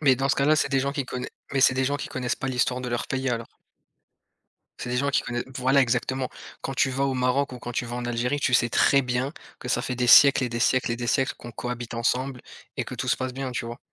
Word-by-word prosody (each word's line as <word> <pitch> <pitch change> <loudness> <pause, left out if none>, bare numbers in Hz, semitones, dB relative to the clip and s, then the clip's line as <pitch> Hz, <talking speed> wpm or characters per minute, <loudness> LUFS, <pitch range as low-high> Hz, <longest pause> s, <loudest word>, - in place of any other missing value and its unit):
Mais 135 -4 +4
dans 135 +2 0
ce - - +1
cas-là, 150 +3 +3
c'est 140 - +1
des 135 -1 +2
gens 140 +1 -1
qui 140 -2 -2
connai 125 0 -5 0.2
mais 135 - +1
c'est 130 - +5
des 130 0 +1
gens 145 +2 0
qui - - -5
connaissent 125 -1 -2
pas 135 - -4
l'histoire 125 0 0
de 125 - -4
leur 120 -1 -2
pays, 135 0 -2
alors. 115 -1 -2 1.3
C'est 125 - -5
des 125 - -1
gens 140 +2 +1
qui 140 - +2
connaissent 120 0 -4
voilà, 130 +2 +3
exactement. 130 +1 -1 0.3
Quand 135 - -4
tu 135 +1 +2
vas 135 +1 0
au 135 - 0
Maroc 130 +1 0
ou 125 - -8
quand 120 - -6
tu 120 - -2
vas 120 0 -6
en 125 - -4
Algérie, 120 +4 -1
tu 125 - +1
sais 120 -1 +4
très 140 +4 +4
bien 125 +2 -1 0.3
que 125 - -7
ça 125 - +1
fait 130 -1 -3
des 125 0 0
siècles 140 +2 +8
et 125 - -1
des 120 0 -3
siècles 130 0 +2
et 120 - -1
des 120 0 -4
siècles 135 +2 +1
qu'on 120 - -10
cohabite 120 +1 -5
ensemble 125 +2 -1 0.3
et - - -1
que - - -8
tout - - -4
se - - +3
passe 130 -1 -4
bien, 135 0 -4
tu 120 - -3
vois? 120 +1 -7
125 Hz, 280 wpm, -25 LUFS, 120-135 Hz, 1.3 s, siècles